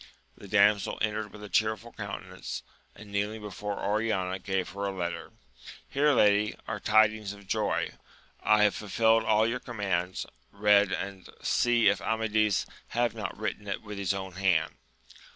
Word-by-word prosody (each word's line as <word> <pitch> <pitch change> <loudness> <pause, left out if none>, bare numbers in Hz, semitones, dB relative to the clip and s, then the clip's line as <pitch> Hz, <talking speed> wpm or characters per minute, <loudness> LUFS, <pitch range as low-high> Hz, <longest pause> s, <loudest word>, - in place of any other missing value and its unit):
The 100 - -12
dam 100 +1 +5
sel - - -4
entered 105 0 -1
with 105 - -11
a - - -6
cheerful 110 +4 0
countenance, 95 -3 -6 0.3
and 105 -1 -12
kneeling 105 +2 -1
before 105 0 -5
Oriana 100 -3 0
gave 95 -1 -2
her 100 +2 -4
a 100 - -1
letter: 90 -3 -4 0.6
Here, 145 +2 +3
lady, 105 -1 +4
are 115 -2 -3
tidings 110 0 +3
of 100 -1 -14
joy! - - 0 0.5
I 105 0 +4
have 105 - +4
fulfilled 110 +2 +2
all 110 0 +3
your 115 +2 -1
commands: 95 -7 -2 0.3
read, 100 0 +4
and 95 -1 -4
see 120 -1 +3
if - - +3
Amadis 110 -2 +1 0.2
have 120 0 0
not 110 -3 -5
written 105 0 -4
it 100 - -3
with 105 -2 -7
his 95 -2 0
own 95 -1 -5
hand. 90 -5 +2
105 Hz, 160 wpm, -29 LUFS, 100-110 Hz, 0.6 s, dam